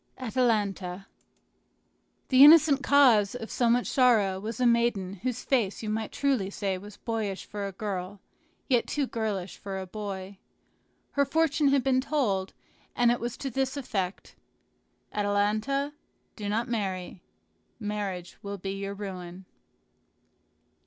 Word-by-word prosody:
ATALANTA 210 -7 -1 1.2
The 260 +1 +8
innocent 295 -2 +8
cause 245 -7 +5
of 225 -2 -6
so 240 -2 +2
much 245 +1 +3
sorrow 220 -8 +3
was 220 +3 -5
a 250 - +2
maiden 235 -5 +1
whose 250 0 -3
face 230 -6 0
you 215 - -2
might 220 0 -3
truly 265 -9 0
say 195 -1 -2
was 205 +1 -12
boyish 220 -4 -3
for 205 -1 -5
a - - -5
girl, 195 -1 -5 0.5
yet 245 -4 +2
too 290 -2 0
girlish 210 -7 -3
for 195 -1 -6
a 190 - -5
boy. 195 -1 -6 0.7
Her 280 - +2
fortune 300 0 +2
had 275 -2 +3
been 260 -1 +2
told, 210 -10 -1 0.4
and 240 -1 +4
it 240 - 0
was 240 0 -4
to 270 - -4
this 265 +2 -1
effect: 195 -8 -4 0.8
"Atalanta, 210 +8 0 0.4
do 205 -2 -4
not 225 +4 0
marry; 190 -6 -3 0.6
marriage 205 -4 -4
will 200 0 -5
be 195 +1 -5
your 195 0 -4
ruin." 185 -2 -7
215 Hz, 140 wpm, -28 LUFS, 195-255 Hz, 1.2 s, The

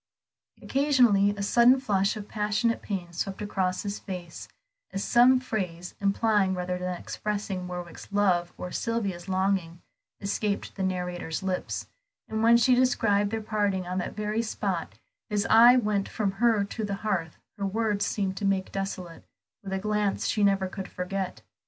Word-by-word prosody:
Occasionally 250 -8 +4
a 200 - -2
sudden 240 +5 +5
flush 200 -4 +1
of 205 -1 -7
passionate 210 +2 0
pain 180 -4 -5
swept 195 +3 -3
across 190 -3 -1
his 200 0 -4
face, 180 -4 -7 0.4
as 195 - -3
some 250 +2 +5
phrase, 180 -8 -4
implying 200 -1 +2
rather 180 0 -3
than 180 0 -3
expressing 200 -3 -4
Warwick's 180 -1 -7
love 180 -4 +2
or 180 - -6
Sylvia's 200 -6 -2
longing, 185 -3 0 0.4
escaped 200 0 -2
the 195 - -6
narrator's 180 -2 -2
lips, 185 -1 -2 0.4
and 220 0 -2
when 230 +1 +6
she 250 +2 +4
described 225 -5 +3
their 220 0 -3
parting 205 -4 0
on 180 +1 -2
that 180 - -4
very 210 +1 -1
spot, 195 -6 -3 0.3
his 205 -1 0
eye 240 +3 +8
went 210 -4 0
from 205 -3 -1
her 220 +1 +2
to 210 +3 -5
the 200 -1 -2
hearth 175 -7 -1 0.2
her 200 - -1
words 210 0 0
seemed 195 -3 -1
to - - -5
make 195 -1 0
desolate, 185 -3 -5 0.4
with 195 - -6
a 190 - 0
glance 210 0 0
she 210 - +1
never 195 -1 +3
could 190 0 -6
forget. 185 +1 -4
200 Hz, 160 wpm, -27 LUFS, 185-215 Hz, 0.4 s, eye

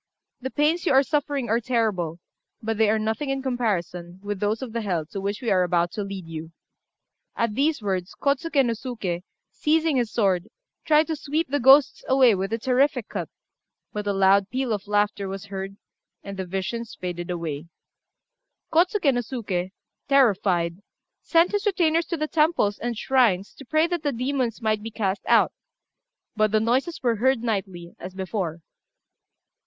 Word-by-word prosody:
The 260 - -3
pains 310 +6 +1
you - - +4
are 270 +1 +6
suffering 285 -3 -1
are 230 +1 +2
terrible, 215 -9 -1 0.4
but 225 -2 -3
they 220 -1 +4
are 220 - +3
nothing 220 +6 -2
in 270 0 -2
comparison 185 -8 -2
with 205 -1 -3
those 210 +5 0
of 240 -4 -7
the 230 - -1
hell 180 -7 -1
to 195 - -4
which 200 +5 -3
we 235 - 0
are 185 - +4
about 175 -1 +1
to 215 - -4
lead 195 -2 -6
you." 165 0 -7 0.8
At 230 -2 0
these 285 0 +1
words, 190 -2 -2
Kôtsuké 280 0 +2
no 235 - +1
Suké, 215 -8 -4 0.3
seizing 315 -1 +1
his 235 -3 0
sword, 195 -4 +1 0.4
tried 305 0 +5
to 320 - -2
sweep 300 +1 -2
the 285 +1 0
ghosts 270 +2 +6
away 260 -3 +5
with 195 +1 -2
a 225 - 0
terrific 255 0 +1
cut; - - -4 0.6
but 210 0 -4
a - - +2
loud 195 0 +4
peal 255 -3 -1
of 205 -1 -4
laughter 205 -1 +1
was 195 +1 -6
heard, 195 0 -6 0.5
and 200 0 -7
the 190 -1 -5
visions 195 +5 -4
faded 175 -1 -4
away. 165 -3 -4 1.1
Kôtsuké 340 -3 +3
no 245 - 0
Suké, 210 -7 -3 0.4
terrified, 195 -9 +3 0.4
sent 335 +1 +3
his 410 +1 0
retainers 335 -4 +2
to 335 - -2
the 305 0 -1
temples 305 -11 +2
and 240 -1 -3
shrines 225 -7 +2
to 275 - -13
pray 310 +5 +3
that 345 -1 -2
the 290 -2 0
demons 250 -2 -2
might 215 -1 +1
be 225 - -5
cast 200 -3 -2
out; - - +5 0.8
but 215 -1 +2
the 215 - +3
noises 260 +10 0
were 235 -3 +2
heard 255 +1 +2
nightly, 190 -6 -3
as 185 +1 -8
before. 185 -4 -3
225 Hz, 175 wpm, -25 LUFS, 195-270 Hz, 1.1 s, are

